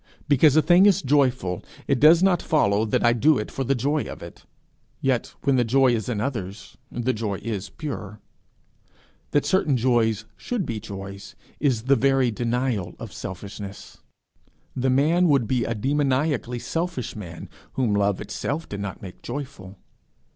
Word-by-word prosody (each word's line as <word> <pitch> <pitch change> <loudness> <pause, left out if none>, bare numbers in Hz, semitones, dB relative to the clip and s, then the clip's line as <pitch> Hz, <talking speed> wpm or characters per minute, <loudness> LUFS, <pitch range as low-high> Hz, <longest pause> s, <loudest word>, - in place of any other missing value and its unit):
Because 145 0 +5
a 155 - +5
thing 180 +3 +6
is 195 -1 +3
joyful, 130 -10 +1 0.2
it 135 -3 +2
does 165 +4 +7
not 185 -3 +3
follow 105 -8 +2
that 110 - +1
I 120 - +5
do 140 +5 +4
it 105 - -4
for 135 - -3
the 135 +2 +1
joy 145 +5 0
of - - -8
it; - - -12 0.5
yet 130 -3 -1
when 140 -2 +3
the 125 - +4
joy 130 +2 +3
is 110 -2 -2
in 110 -4 -1
others, 110 -5 -5 0.2
the 125 +1 -1
joy 105 -2 -2
is 105 -4 -4
pure. 105 -9 -6 1.1
That 145 - +1
certain 155 -8 +2
joys 115 -3 +1
should 235 -7 -3
be 110 -2 -3
joys, 100 -2 -8 0.2
is 125 -7 +1
the 135 +2 +4
very 135 -1 +2
denial 120 -4 -2
of - - -9
selfishness. 100 +1 -8 0.8
The 130 +1 0
man 155 +7 +3
would 140 -7 +3
be 125 -1 0
a 115 - -2
demoniacally 135 0 0
selfish 165 -1 -3
man, 90 -5 -8 0.3
whom 120 -5 0
love 100 -1 +1
itself 150 +4 -4
did 100 - -6
not 100 -1 -6
make 90 -2 -10
joyful. 130 -9 -7
125 Hz, 165 wpm, -24 LUFS, 105-145 Hz, 1.1 s, does